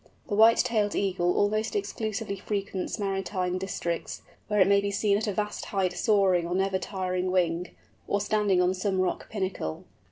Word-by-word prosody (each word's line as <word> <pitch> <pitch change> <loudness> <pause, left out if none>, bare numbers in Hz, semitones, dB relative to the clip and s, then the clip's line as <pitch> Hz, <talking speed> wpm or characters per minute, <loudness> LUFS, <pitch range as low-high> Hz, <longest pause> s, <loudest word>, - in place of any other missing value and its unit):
The - - -2
White 225 +2 +6
tailed 210 -3 +1
Eagle 180 -3 +1
almost 215 - +1
exclusively 220 - -3
frequents 200 -2 -3
maritime 195 -2 -2
districts, 175 -3 -4 0.2
where 210 0 +1
it 190 - +7
may 200 0 +4
be 200 - -1
seen 200 0 +1
at 210 +2 -1
a - - +1
vast 210 +1 -3
height 190 -3 0
soaring 190 -5 +3
on 175 +1 -1
never 190 0 +1
tiring 185 -2 -2
wing, 175 -1 0 0.4
or 200 - +1
standing 205 -3 +2
on 180 +1 +2
some 190 0 -1
rock 185 - -1
pinnacle. 190 - -3
195 Hz, 170 wpm, -27 LUFS, 185-205 Hz, 0.4 s, it